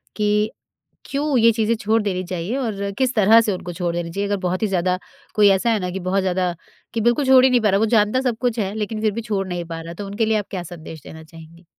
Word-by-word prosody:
कि, 210 +1 +1 0.6
क्यों 280 -1 0
ये 230 0 +6
चीज़ें 225 0 +1
छोड़ 220 +1 +1
देनी 185 -3 -2
चाहिए 180 +5 -3
और 200 -6 -3
किस 260 -1 +1
तरह 220 +2 +6
से 220 - -1
उनको 180 -1 -6
छोड़ 175 0 -2
देनी 170 -1 -3
चाहिए? 200 +3 -2
अगर 205 - 0
बहुत 185 +1 -1
ही - - +2
ज़्यादा 185 -1 0 0.4
कोई 205 -1 +6
ऐसा 195 +4 +2
है 220 - +1
ना 180 -2 -3
कि 190 - -4
बहुत 190 +2 0
ज़्यादा 180 -1 -1 0.4
कि 230 - -1
बिल्कुल 240 +5 +2
छोड़ 260 -1 +6
ही - - +5
नहीं 245 -2 +3
पा 210 - +3
रहा, 195 - +2
वो 220 - +3
जानता 215 +3 +2
सब 245 -4 -1
कुछ 245 -2 0
है 195 0 -1
लेकिन 215 0 -3
फ़िर 215 -1 +2
भी 230 - -3
छोड़ 200 -4 -2
नहीं 175 -1 -4
पा 165 -1 -6
रहा, 165 +1 -8
तो 200 +4 -7
उनके 205 +3 -1
लिए 220 0 +2
आप 205 - -3
क्या 185 -3 -4
संदेश 160 -2 -10
देना 160 0 -11
चाहेंगी? 165 +2 -15
205 Hz, 270 wpm, -21 LUFS, 180-225 Hz, 0.6 s, ये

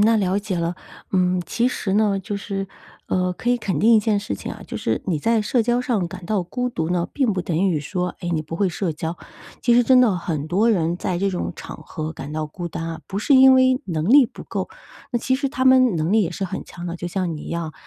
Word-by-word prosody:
那 225 +2 +5
了 190 -1 +1
解 200 -3 -3
了。 170 +1 -1 0.4
嗯， 180 -1 +2
其 240 +1 +1
实 195 -6 -3
呢， 205 -2 +2
就 200 +2 -4
是， 195 -1 -4 0.4
呃， 180 0 0
可 240 +7 -2
以 245 - +3
肯 200 -5 -2
定 230 +2 +5
一 220 - +6
件 210 -1 +1
事 100 - -4
情 - - -7
啊， - - -10
就 - - -6
是 110 - -1
你 165 -5 0
在 225 +6 +2
社 235 +2 +1
交 240 +2 +1
上 215 -9 -1
感 185 0 -9
到 200 -1 0
孤 250 +8 -3
独 160 -8 -2
呢， 175 -1 0
并 260 -6 +1
不 185 -2 -2
等 165 -3 -2
于 160 -4 +1
说， 180 +4 -3
哎， 175 - -4
你 160 - 0
不 165 +2 -6
会 195 -1 +2
社 175 -1 -2
交。 160 +2 -4 0.4
其 240 -1 +3
实 245 - +6
真 255 +1 +5
的 220 -7 +3
很 160 -4 -3
多 200 +8 +2
人 170 -4 +1
在 180 -1 -2
这 200 +1 +1
种 180 - -3
场 - - -9
合 155 -1 -5
感 145 -1 -8
到 155 0 -2
孤 170 +3 -6
单 165 - -5
啊， 165 -1 -6
不 195 - -4
是 275 +6 +3
因 265 0 +8
为 260 0 +4
能 160 -1 -2
力 275 +2 +8
不 - - -9
够， - - -4 0.4
那 240 - +2
其 260 +3 0
实 275 +1 -1
他 260 -1 -2
们 260 0 +7
的 175 - -2
能 160 +5 0
力 220 -1 +4
也 170 - -1
是 195 - -4
很 190 +1 -5
强 175 0 -9
的， 170 0 -4
就 175 - -5
像 175 -3 -2
你 - - -8
一 - - -8
样。 165 -2 -3
190 Hz, 290 characters per minute, -22 LUFS, 170-225 Hz, 0.4 s, 因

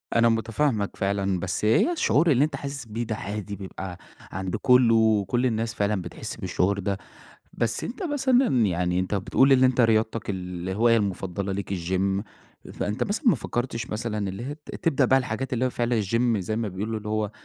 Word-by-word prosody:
أنا 115 0 +5
متفاهمَك 115 -1 0
فعلًا، 100 -1 0
بس 95 +3 -2
هي 115 - +4
الشعور 170 - +3
اللي 135 +2 +4
أنت 150 -2 -1
حاسس 140 -2 -6
بيه 115 +1 -4
ده 110 -1 -3
عادي، 105 0 -5
بيبقى 95 -2 -7 0.3
عند 95 -1 -3
كله، 125 -3 +5
وكل 110 +2 +2
الناس 115 -1 -1
فعلًا 100 -2 0
بتحس 90 +5 -7
بالشعور 95 0 0
ده. 100 0 -1 0.6
بس 115 - -1
أنت 255 - -5
مثلًا 260 - +2
يعني، 90 -1 0
أنت 95 +2 -1
بتقول 130 +7 +3
إن 130 -1 +6
أنت 130 -1 +4
رياضتك 110 -1 +1
الهواية 95 +5 0
المفضلة 95 -1 -2
ليك 100 0 -3
الGym، 95 +3 -1 0.5
فأنت 105 +4 -2
مثلًا 225 +7 -2
ما 230 - +6
فكرتش 120 -2 -3
مثلًا، 105 -2 -2
اللي 95 +5 -6
هي 145 +2 -5
ت 150 - -11
تبدأ 140 -5 +2
بقى 135 +2 +4
الحاجات 130 +1 -3
اللي 125 +1 +1
هي - - +1
فعلًا 120 -2 0
الGym، 115 +3 +1
زي 105 +3 -3
ما 115 -1 -1
بيقولوا، 105 +4 -3
اللي 105 0 -6
هو 110 -1 -1
110 Hz, 185 wpm, -25 LUFS, 100-125 Hz, 0.6 s, إن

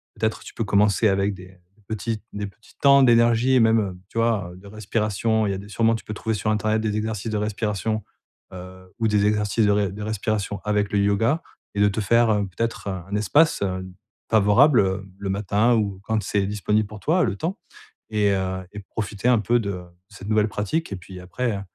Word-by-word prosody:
peut-être 110 -1 -1
tu - - -11
peux 115 - -2
commencer 105 +1 +3
avec 100 0 +1
des 90 -1 -11 0.3
des 105 - -28
petits 110 0 -3
des 105 0 -4
petits 105 +3 -19
temps 140 0 +6
d'énergie 120 +1 +4
et - - +6
même, 115 -1 +4
heu, 95 -4 -3
tu 115 - -3
vois? 110 -6 0
De 95 +2 -14
respiration. 110 +1 -1
Il - - 0
y - - -1
a - - -3
des 100 +1 -9
sûrement, 115 +2 +2
tu 110 - -8
peux 110 - -5
trouver 110 +1 -2
sur 105 +1 -1
internet 110 0 +1
des 110 -1 -1
exercices 110 0 -3
de 105 - -1
respiration, 105 0 -2 0.5
heu, 95 0 -11
ou 115 - +2
des 105 -1 +2
exercices 105 +1 +1
de 105 - +4
res 100 -1 +2 0.2
respiration 105 -1 -2
avec 105 -1 0
le 100 - +3
yoga 110 +10 +2 0.3
et 100 - 0
de 105 - +6
te 105 +2 -2
faire, 115 +3 +3
heu, 105 -1 +1
peut-être, 115 +3 -4
heu, - - -1 0.2
un - - -1
espace, 145 +10 +3
heu, 95 -1 -3 0.4
favorable, 110 +7 +5
heu, 95 0 -1
le 100 -1 -4
matin 105 +4 +2
ou 100 -4 -1
quand 110 0 0
c'est 100 -1 0
disponible 105 +1 0
pour 105 0 -10
toi. 170 - +2
Le - - 0
temps 180 - -3 0.5
et 105 -1 +2
heu 95 -1 -1
et 105 - -8
profiter 105 +1 -5
un 125 -2 +5
peu 120 +4 +2
de 100 - -3
de 90 +2 -12
cette 100 +1 -9
nouvelle 110 0 +2
pratique 105 +9 -2
et - - -2
puis, 90 +1 -11
après, 100 +3 -3
105 Hz, 220 wpm, -23 LUFS, 100-110 Hz, 0.5 s, temps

